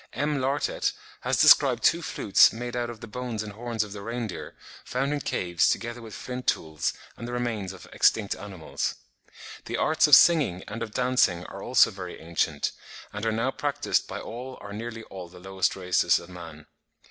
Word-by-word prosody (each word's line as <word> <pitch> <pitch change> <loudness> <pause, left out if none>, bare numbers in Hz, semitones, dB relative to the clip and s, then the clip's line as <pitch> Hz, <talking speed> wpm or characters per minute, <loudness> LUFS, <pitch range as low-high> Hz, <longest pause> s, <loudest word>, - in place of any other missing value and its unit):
M. 145 +1 0
Lartet 135 +3 0 0.3
has - - -1
described - - +6
two - - +4
flutes - - +4
made 120 +1 -5
out 120 -1 -1
of 115 -2 -9
the 115 - -8
bones 120 -1 -4
and 105 -1 -8
horns 115 0 -2
of 105 -2 -8
the 100 - -7
reindeer, 115 -1 -5 0.3
found 135 +3 -1
in 145 - -2
caves 85 -8 +1
together 120 +1 -2
with 110 -2 -9
flint 125 0 -6
tools 80 -1 0 0.2
and 120 - -7
the - - -5
remains 115 -6 -2
of 95 - -12
extinct 105 -3 +3
animals. 95 -6 -4 0.7
The - - -3
arts 155 0 +3
of 150 - +10
singing 140 - +5
and 115 +3 -6
of 115 - -3
dancing 125 -9 +2
are 100 - -9
also 120 0 +4
very 90 -3 -8
ancient, 80 -3 -1 0.4
and 105 +1 -5
are - - +2
now 115 +4 0
practised 145 +1 -1
by - - -5
all 125 +3 -7
or 100 0 -9
nearly 115 +1 -6
all 95 -4 -9
the 90 - -15
lowest 95 +1 -1
races 90 -1 +2
of 85 - -9
man. 80 -4 -10
110 Hz, 190 wpm, -26 LUFS, 95-125 Hz, 0.7 s, of